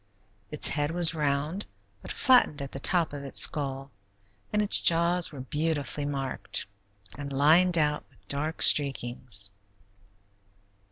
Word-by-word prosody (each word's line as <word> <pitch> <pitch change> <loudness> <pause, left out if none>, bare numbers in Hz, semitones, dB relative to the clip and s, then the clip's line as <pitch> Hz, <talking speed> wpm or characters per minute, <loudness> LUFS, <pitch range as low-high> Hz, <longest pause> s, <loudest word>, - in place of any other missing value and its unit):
Its 150 - +1
head 145 0 -2
was 170 0 +2
round, 150 +5 -3 0.3
but - - -9
flattened 250 - +2
at 140 -1 -7
the 135 - -8
top 170 +1 0
of 140 -1 -8
its 135 - -2
skull, 135 -2 0 0.6
and 210 - -1
its 205 - +5
jaws 170 +1 +3
were 140 -4 -10
beautifully 145 +1 -4
marked 135 -8 -2 0.5
and 140 0 -7
lined 165 +6 +3
out 150 -1 -1
with 105 -7 -31
dark 150 +5 0
streakings. 120 -7 +2
145 Hz, 130 wpm, -26 LUFS, 135-165 Hz, 0.6 s, its